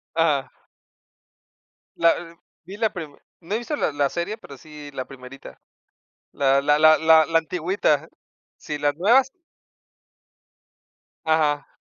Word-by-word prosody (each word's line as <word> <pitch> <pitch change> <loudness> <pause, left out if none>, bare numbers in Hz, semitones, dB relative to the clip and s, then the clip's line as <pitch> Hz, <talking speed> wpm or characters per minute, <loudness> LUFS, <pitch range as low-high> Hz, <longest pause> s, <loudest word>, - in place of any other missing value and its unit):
Ajá. 155 -5 +1 1.5
La 170 0 +1 0.3
vi 195 - -9
la 220 -1 0
prime 160 -7 -8 0.2
no 180 +4 -5
he - - +1
visto 240 +6 -4
la 155 - -1
la 145 -1 +1
serie, 170 +8 -4
pero 140 -10 -13
sí 150 +1 -12
la 130 -2 -5
primerita. 130 0 -13 0.7
La 135 0 +2
la 145 +1 +2
la 155 0 +6
la 160 0 +5
la 165 - +2
antigüita. 160 -2 -1 0.5
Sí, 150 - -6
las 145 0 0
nuevas 235 - +4 2.0
Ajá. 155 -2 +1
155 Hz, 125 wpm, -23 LUFS, 145-175 Hz, 2.0 s, la